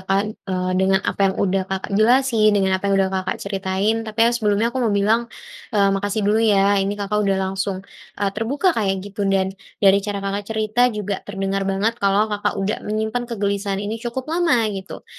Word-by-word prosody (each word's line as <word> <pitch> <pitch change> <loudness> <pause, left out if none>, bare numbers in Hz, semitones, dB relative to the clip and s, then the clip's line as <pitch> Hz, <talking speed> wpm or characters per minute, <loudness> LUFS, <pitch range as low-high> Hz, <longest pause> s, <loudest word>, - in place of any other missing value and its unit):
Kak, 195 +1 +3 0.3
eee, 185 -1 -1
dengan 190 0 +3
apa - - -2
yang 190 - -3
udah 195 -1 +1
Kakak 190 +1 -4
jelasin, 235 -1 +4
dengan 190 -1 +2
apa 200 - -4
yang 200 - +2
udah 190 -1 +2
Kakak 185 0 -2
ceritain. 195 +1 -1
Tapi 215 +1 -8
ya 235 - +4
sebelumnya 210 -1 +1
aku 260 - -2
mau 225 -4 +1
bilang, 220 +4 +2 0.5
eee, 200 -1 +4
makasih 205 +2 -1
dulu 215 +2 +3
ya 200 -2 +4
ini 195 +1 -1
Kakak 205 +1 -1
udah 195 -2 +1
langsung, 190 0 -3 0.4
eee, 200 -1 0
terbuka 280 - +1
kaya 195 -3 0
gitu 205 0 -5
dan 190 -1 +1 0.3
dari 195 0 +6
cara 205 0 -3
Kakak 200 +1 -2
cerita 215 +1 -1 0.2
juga 205 -2 -3
terdengar 195 -1 -2
banget 200 +4 0
kalau 200 +1 +3
Kakak 205 0 -1
udah 195 +2 -1
menyimpan 220 +3 -1
kegelisahan 200 -3 -2
ini 215 +2 -3
cukup 245 +1 -4
lama, 330 -9 +2
gitu. 190 -1 -8
200 Hz, 195 wpm, -21 LUFS, 195-220 Hz, 0.5 s, dari